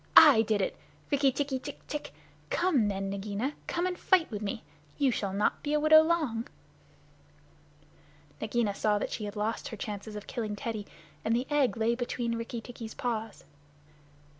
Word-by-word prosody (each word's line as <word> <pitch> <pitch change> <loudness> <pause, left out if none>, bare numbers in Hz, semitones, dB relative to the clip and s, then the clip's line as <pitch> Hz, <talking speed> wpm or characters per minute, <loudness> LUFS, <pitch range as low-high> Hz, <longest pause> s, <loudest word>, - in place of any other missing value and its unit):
I 285 -8 +10
did 215 -2 +1
it! - - -1 0.4
Rikki 280 -1 +4
tikki 270 0 -1
tck 285 +2 -7
tck! 295 -1 -4 0.4
Come 310 - +2
then, 195 -1 -2
Nagaina. 205 +7 -2
Come 345 +1 0
and 365 0 -1
fight 365 -7 +3
with 210 -1 -4
me. 210 +1 -3 0.3
You 275 -2 +3
shall 200 -4 -2
not 200 +2 +1
be 295 - -2
a 300 - +4
widow 310 +1 +8
long." 310 -9 0 1.9
Nagaina 235 -5 0
saw 210 +1 +2
that - - -3
she 215 - -3
had 205 0 -6
lost 215 +2 -2
her 220 - -7
chance 205 0 -5
of 210 -1 -7
killing 220 -4 -3
Teddy, 215 -1 -4 0.4
and 225 - +2
the 245 +2 0
egg 280 -5 +2
lay 225 +1 +2
between 240 -1 -2
Rikki 230 0 -4
tikki's 230 -2 -8
paws. 225 -3 -3
230 Hz, 170 wpm, -30 LUFS, 210-280 Hz, 1.9 s, I